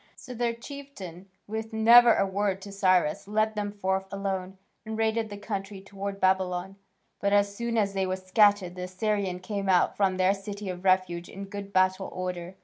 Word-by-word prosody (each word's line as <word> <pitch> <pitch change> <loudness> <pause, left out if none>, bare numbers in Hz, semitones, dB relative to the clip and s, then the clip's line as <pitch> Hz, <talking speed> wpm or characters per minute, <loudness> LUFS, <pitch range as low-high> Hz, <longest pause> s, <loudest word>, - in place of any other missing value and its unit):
So 250 - -10
their 235 -1 -1
chieftain, 230 - -10 0.2
with 220 +1 -5
never 235 +2 +7
a 195 - +2
word 195 0 -1
to 200 - -8
Cyrus, 185 -4 +2
led 215 +1 +1
them 205 -1 -3
forth 190 -1 -2
alone, 195 -1 -3 0.3
and 220 -1 -5
raided 220 0 0
the 205 - -7
country 200 -1 -5
towards 195 +1 -6
Babylon. 190 0 0 0.4
But, 200 0 +1
as 200 0 +3
soon 235 +1 -2
as 200 -2 +1
they 190 -1 0
were 185 - -1
scattered 190 -1 +3
the 180 0 -5
Assyrians 185 -1 -2
came 200 0 -3
out 180 -2 +3
from 190 -2 +1
their 185 +1 +3
city 200 0 -6
of 180 0 -6
refuge 185 -2 +1
in 195 +1 -7
good 200 0 -7
battle 185 0 +2
order. 180 0 -5
195 Hz, 185 wpm, -27 LUFS, 185-210 Hz, 0.4 s, never